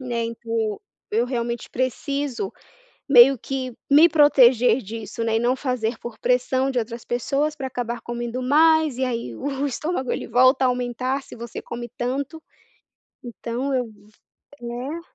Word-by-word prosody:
e - - -9
nem 235 -2 -2
para 230 0 -13
o 220 -3 -1 0.3
eu 230 +3 +1
realmente 235 -2 -3
preciso 275 - -2 0.6
meio 270 0 +8
que 260 +1 -4 0.2
me 305 +4 +8
proteger 255 -6 +5
disso, 225 +1 -7
né 225 -1 +1
e - - +1
não 245 +2 +2
fazer 250 -4 -2
por 235 -2 -8
pressão 260 +2 +1
de 255 - 0
outras 230 0 -5
pessoas 275 +5 -1
pra 270 -3 -4
acabar 240 -2 -4
comendo 240 +1 -4
mais 310 +1 +4
e 260 - 0
aí 230 - -4
o 275 - -3
estômago 280 -1 -3
ele - - -5
volta 255 +2 +4
a - - +5
aumentar 250 +2 -2
se - - -12
você 235 -1 -7
come 240 0 -7
tanto, 275 +6 -3 0.8
então 240 +3 -4
eu 255 -1 +1
v 220 - -14 0.7
né? 245 +7 -5
250 Hz, 160 wpm, -23 LUFS, 235-270 Hz, 0.8 s, meio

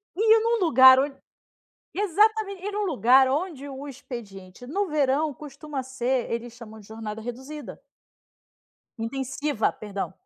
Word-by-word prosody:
E 440 +2 +5
num 460 0 +1
lugar 260 -4 +8
onde 275 0 -1 0.8
exatamente. 410 0 +1
E 415 - -3
no 415 +1 -2
lugar 260 - +4
onde 285 -1 -3
o 275 +1 -8
expediente 235 -7 -10
no 385 +8 -2
verão 295 0 +1
costuma 285 0 -7
ser 260 -1 -2
eles 235 +1 -4
chamam 220 -3 -12
de 205 - -17
jornada 220 0 -7
reduzida. 265 +6 -8 1.2
Intensiva, 265 +2 -2
perdão. 200 -3 -6
270 Hz, 130 wpm, -25 LUFS, 240-310 Hz, 1.2 s, lugar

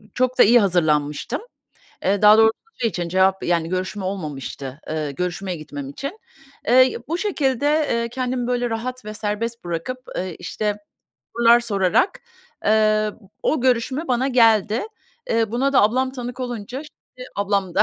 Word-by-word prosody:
çok 255 0 0
da - - +9
iyi 240 +2 +6
hazırlanmıştım. 165 - 0 0.6
Eee, 200 +1 +1
daha 210 +1 +8
doğrusu 220 0 +6 0.3
şey 230 -2 +1
için 175 -2 -3
cevap, 190 +2 +2
yani 170 -2 +1
görüşme 185 +2 -3
olmamıştı, 145 -6 -5
ııı, 155 -2 -2
görüşmeye 180 +4 -3
gitmem 145 -3 -7
için. 280 - -6 0.5
Eee, 255 0 +5
bu 335 +2 -1
şekilde, 285 - 0 0.2
eee, 235 0 0
kendimi 250 0 -2
böyle 245 -1 0
rahat 250 +1 -4
ve 215 0 -6
serbest 220 +1 -3
bırakıp, 175 +10 -4 0.2
eee, 185 -2 -3
işte, 205 +4 -2 0.6
sorular 235 0 +6
sorarak, 200 - +1 0.4
eee, 215 0 +3 0.3
o 310 - +1
görüşme 260 +5 0
bana 255 +2 +1
geldi. 225 -3 +4 0.5
Eee, 225 -1 +1
buna 270 +4 +1
da 260 - +5
ablam 255 +5 +2
tanık 245 0 -6
olunca, 245 -1 -5
şimdi 255 -4 -14
ablam 200 -3 0
da - - +5
220 Hz, 150 wpm, -22 LUFS, 185-250 Hz, 0.6 s, da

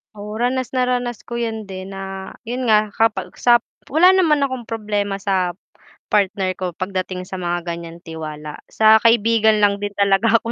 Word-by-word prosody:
O, 210 +1 -7
ranas 255 +2 -1
na 255 - +2
ranas 245 -2 -2
ko 235 0 -5
yan 220 -2 -3
din 190 0 -8
na, 195 0 -7
yun 245 +2 -3
nga, 215 -1 +3
kapag 225 +1 0
sap 240 -1 +4 0.2
wala 350 +6 +5
naman 320 -7 +3
akong 260 -4 -3
problema 210 -3 -2
sa 190 -3 -1 0.6
partner 195 -2 +1
ko 180 -3 -3
pagdating 185 0 -4
sa 185 +1 -7
mga 175 -1 -2
ganyan 170 -1 -6
tiwala. 155 -2 -7
Sa 220 0 +5
kaibigan 220 -1 +3
lang 200 0 +3
din 205 0 -4
talaga 200 +3 +3
ako 230 - -5
210 Hz, 170 wpm, -20 LUFS, 190-235 Hz, 0.6 s, wala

